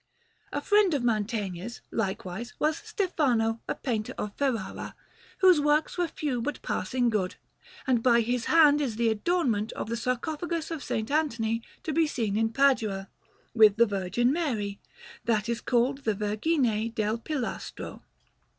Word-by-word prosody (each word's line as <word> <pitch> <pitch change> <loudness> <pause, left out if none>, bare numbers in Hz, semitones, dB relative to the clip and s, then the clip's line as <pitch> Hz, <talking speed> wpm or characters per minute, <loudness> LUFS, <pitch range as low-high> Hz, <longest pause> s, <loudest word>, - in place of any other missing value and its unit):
A - - -2
friend 410 -5 +4
of 265 - -1
Mantegna's, 215 -2 -2
likewise, 195 +2 -3
was 310 +1 +1
Stefano, 245 - 0
a - - -1
painter 220 -5 -3
of 210 -1 -4
Ferrara, 250 -9 -2 0.5
whose 365 -5 +6
works 295 +1 +2
were 355 -1 0
few 290 -6 -2
but 295 +5 -3
passing 245 -2 0
good; 190 -4 -1 0.5
and 250 -3 +2
by 235 -1 +5
his 240 +1 -1
hand 300 -2 +5
is 250 -6 -1
the 230 0 +2
adornment 225 - 0
of - - -5
the 235 - -1
sarcophagus 310 +8 -2
of 325 - -3
S. - - -10 0.2
Anthony 230 -7 0 0.2
to 315 - -2
be 320 +1 +3
seen 220 -8 -1
in 225 +1 +1
Padua, 225 -8 +2 0.4
with 215 -3 +6
the 235 +1 +5
Virgin 205 +4 0
Mary, 220 -12 -2 0.5
that 215 -2 +1
is 235 0 -2
called 255 +2 +1
the 220 -6 -1
Vergine 220 +2 0
del 215 +1 0
Pilastro. 260 -1 -5
235 Hz, 150 wpm, -28 LUFS, 215-295 Hz, 0.5 s, whose